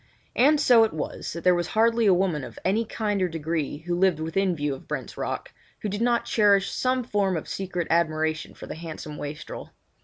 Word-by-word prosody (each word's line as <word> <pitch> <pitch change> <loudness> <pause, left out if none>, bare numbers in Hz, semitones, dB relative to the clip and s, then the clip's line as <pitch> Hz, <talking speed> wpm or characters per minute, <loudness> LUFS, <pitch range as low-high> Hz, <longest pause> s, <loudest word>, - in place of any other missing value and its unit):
And 295 +4 +5
so 245 -5 +6
it 220 - 0
was 155 - -4
that 170 - -6
there 180 - +5
was 175 -1 0
hardly 230 +1 +3
a - - +7
woman 175 -6 0
of - - -9
any 210 +5 +2
kind 210 -2 -1
or 185 - +3
degree, 160 -2 -3
who 175 - -1
lived 180 -2 +2
within 180 +3 0
view 145 -2 -1
of 135 - -10
Brent's - - -5
Rock, - - -4 0.3
who 210 - -2
did 205 +3 -3
not 240 0 +2
cherish 200 -3 +3
some 255 0 0
form 200 -5 0
of 155 - -6
secret 180 -3 -3
admiration 160 -1 0
for - - -9
the - - -6
handsome 155 -2 -7
wastrel. 145 +1 -7
180 Hz, 210 wpm, -26 LUFS, 160-215 Hz, 0.3 s, a